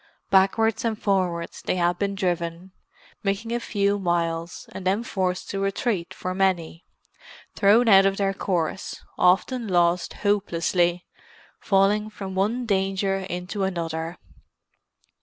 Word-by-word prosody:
Backwards 200 Hz, +4 st, +3 dB
and 225 Hz, -2 st, -1 dB
forwards 180 Hz, -4 st, -1 dB
they -, -, -1 dB
had 175 Hz, 0 st, +1 dB
been 200 Hz, -1 st, -1 dB
driven; 175 Hz, -1 st, -2 dB, 0.5 s
making 205 Hz, +3 st, -2 dB
a 240 Hz, -, 0 dB
few 205 Hz, -3 st, 0 dB
miles, 170 Hz, -2 st, -2 dB
and 190 Hz, -, -7 dB
then 195 Hz, +5 st, +1 dB
forced 185 Hz, -4 st, -2 dB
to 195 Hz, -, -3 dB
retreat 195 Hz, -2 st, -1 dB
for 185 Hz, -, -4 dB
many; 185 Hz, -3 st, 0 dB, 0.7 s
thrown 220 Hz, +4 st, +4 dB
out 195 Hz, -2 st, +7 dB
of 195 Hz, 0 st, -1 dB
their 195 Hz, -1 st, +1 dB
course, 185 Hz, -2 st, -3 dB, 0.2 s
often 225 Hz, +6 st, +2 dB
lost 175 Hz, -1 st, +2 dB
hopelessly, 175 Hz, -3 st, +1 dB, 0.5 s
falling 205 Hz, +2 st, +2 dB
from 195 Hz, -3 st, -7 dB
one 215 Hz, +6 st, 0 dB
danger 195 Hz, -1 st, 0 dB
into 185 Hz, +1 st, -4 dB
another. 165 Hz, -2 st, -3 dB
190 Hz, 125 wpm, -24 LUFS, 175-200 Hz, 0.7 s, out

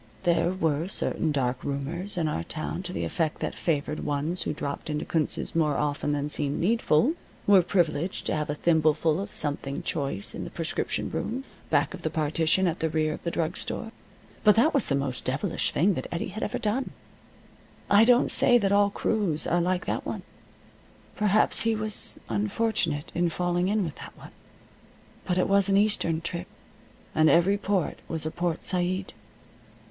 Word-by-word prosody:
There 175 Hz, 0 st, +2 dB
were 165 Hz, -3 st, 0 dB
certain 165 Hz, -4 st, -1 dB
dark 130 Hz, -3 st, -1 dB
rumors 160 Hz, +8 st, -3 dB
in 165 Hz, -2 st, +1 dB
our 85 Hz, -, -2 dB
town 155 Hz, -, -4 dB
to 180 Hz, -1 st, -6 dB
the -, -, -3 dB
effect 160 Hz, -3 st, -1 dB
that -, -, -2 dB
favored 150 Hz, -2 st, -1 dB
ones 150 Hz, +5 st, -2 dB
who -, -, -1 dB
dropped 140 Hz, +1 st, -5 dB
into 150 Hz, 0 st, -2 dB
Kunz's 160 Hz, -3 st, -1 dB
more 150 Hz, -4 st, +2 dB
often 145 Hz, 0 st, -1 dB
than 145 Hz, 0 st, -1 dB
seemed 145 Hz, -1 st, -1 dB
needful 225 Hz, -, +3 dB, 0.3 s
were 200 Hz, -2 st, +7 dB
privileged 175 Hz, -1 st, 0 dB
to -, -, 0 dB
have 150 Hz, -1 st, -2 dB
a 150 Hz, -, -1 dB
thimbleful 160 Hz, 0 st, +2 dB
of 200 Hz, +2 st, -5 dB
something 145 Hz, -2 st, -2 dB
choice 140 Hz, -10 st, -1 dB
in -, -, -5 dB
the -, -, -6 dB
prescription -, -, -3 dB
room, 255 Hz, +4 st, -3 dB, 0.3 s
back 145 Hz, -1 st, +2 dB
of -, -, -8 dB
the 155 Hz, -, -1 dB
partition 160 Hz, +4 st, +1 dB
at 170 Hz, -1 st, 0 dB
the 160 Hz, -, 0 dB
rear 155 Hz, 0 st, 0 dB
of -, -, -8 dB
the 170 Hz, -, -2 dB
drug 165 Hz, -1 st, -1 dB
store. 225 Hz, -, -4 dB, 0.5 s
But 210 Hz, -1 st, +6 dB
that 275 Hz, +9 st, +4 dB
was 280 Hz, -5 st, +2 dB
the 140 Hz, -, +1 dB
most 135 Hz, -2 st, -2 dB
devilish 160 Hz, +7 st, 0 dB
thing 190 Hz, +6 st, +3 dB
that -, -, -4 dB
Eddie 170 Hz, +3 st, -3 dB
had 215 Hz, +4 st, -7 dB
ever 250 Hz, -, -1 dB
done. 240 Hz, +3 st, -1 dB, 0.9 s
I 205 Hz, +2 st, +6 dB
don't 245 Hz, +2 st, +4 dB
say 245 Hz, -2 st, +5 dB
that 200 Hz, -4 st, +1 dB
all 200 Hz, 0 st, +4 dB
crews 200 Hz, -6 st, 0 dB
are 175 Hz, +1 st, +2 dB
like 180 Hz, +1 st, 0 dB
that -, -, -2 dB
one. -, -, -5 dB, 0.9 s
Perhaps 210 Hz, 0 st, +3 dB
he 225 Hz, -1 st, +2 dB
was 215 Hz, 0 st, -2 dB
unfortunate 200 Hz, -7 st, -1 dB
in 175 Hz, 0 st, +1 dB
falling 175 Hz, +1 st, 0 dB
in 210 Hz, +1 st, +1 dB
with 160 Hz, -4 st, -5 dB
that -, -, -11 dB
one. -, -, -12 dB, 0.9 s
But 180 Hz, -, 0 dB
it 180 Hz, -, +2 dB
was 200 Hz, 0 st, +3 dB
an 195 Hz, -, +4 dB
Eastern 200 Hz, -6 st, +2 dB
trip, 170 Hz, +1 st, -4 dB, 0.7 s
and 155 Hz, 0 st, +4 dB
every 175 Hz, +7 st, +4 dB
port 195 Hz, -4 st, -1 dB
was 160 Hz, -2 st, -3 dB
a 155 Hz, -, -2 dB
Port 175 Hz, -1 st, -2 dB
Said. 185 Hz, +1 st, -1 dB
170 Hz, 185 wpm, -27 LUFS, 150-200 Hz, 0.9 s, were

